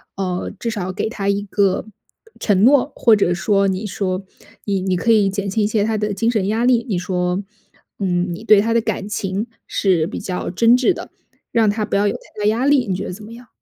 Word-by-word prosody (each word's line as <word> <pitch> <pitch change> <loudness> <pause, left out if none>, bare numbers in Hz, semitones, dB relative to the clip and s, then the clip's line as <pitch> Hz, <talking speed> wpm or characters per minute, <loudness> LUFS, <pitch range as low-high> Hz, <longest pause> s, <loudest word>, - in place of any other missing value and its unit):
呃， 185 -2 -3
至 230 - -3
少 185 -4 -3
给 220 - -2
他 200 -4 -4
一 200 0 +1
个 200 -1 0 0.5
承 200 -2 +2
诺， 275 +2 +4
或 230 - +4
者 175 -3 +2
说 195 +2 +1
你 190 +3 -2
说， 185 -1 -2 0.4
你 200 -2 -1
你 185 -1 0
可 230 +6 +1
以 205 -3 +4
减 200 0 -3
轻 215 +3 0
一 - - +1
些 215 -1 +1
他 220 0 0
的 210 0 -1
精 230 +4 +1
神 205 -4 0
压 220 +3 0
力， 240 -2 +3
你 195 -5 -1
说， 180 +1 -1 0.6
嗯， 180 -2 0
你 220 +6 -9
对 210 -3 +6
他 230 +1 0
的 230 - +4
感 210 -2 -3
情 200 +1 -2 0.2
是 175 -5 +1
比 - - -6
较 180 -1 -4
真 230 +6 +4
挚 265 +9 +3
的， - - -9 0.4
让 225 -2 +3
他 215 +1 -1
不 200 - -1
要 205 +1 +2
有 - - 0
太 210 - -9
大 - - +1
压 230 +5 +1
力， 275 -5 +3
你 185 - -1
觉 195 - -4
得 - - -5
怎 205 +4 -9
么 225 - -11
样？ 240 0 -13
205 Hz, 255 characters per minute, -20 LUFS, 190-225 Hz, 0.6 s, 对